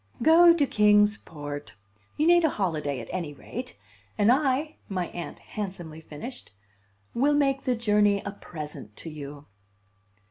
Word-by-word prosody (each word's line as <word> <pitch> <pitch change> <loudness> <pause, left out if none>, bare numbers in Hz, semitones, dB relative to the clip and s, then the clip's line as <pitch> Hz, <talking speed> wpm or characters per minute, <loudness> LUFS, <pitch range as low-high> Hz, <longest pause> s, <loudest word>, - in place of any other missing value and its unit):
"Go 340 +3 +8
to 330 -4 +3
Kings 210 -2 +4
Port. 145 -4 -8 0.4
You 305 - +2
need 345 0 +6
a 320 - +4
holiday, 155 - -2
at - - -9
any 165 -6 -4
rate. 250 - -8 0.4
And 210 +2 +5
I," 280 +3 +1
my 185 -3 -2
Aunt 175 - -7
handsomely 175 -6 -7
finished, 160 - -9 0.6
"will 285 +5 +2
make 275 -2 +2
the 250 - 0
journey 210 -3 +3
a 200 - -3
present 150 - -9
to 165 - -7
you." 145 -1 -9
205 Hz, 145 wpm, -27 LUFS, 155-265 Hz, 0.6 s, Go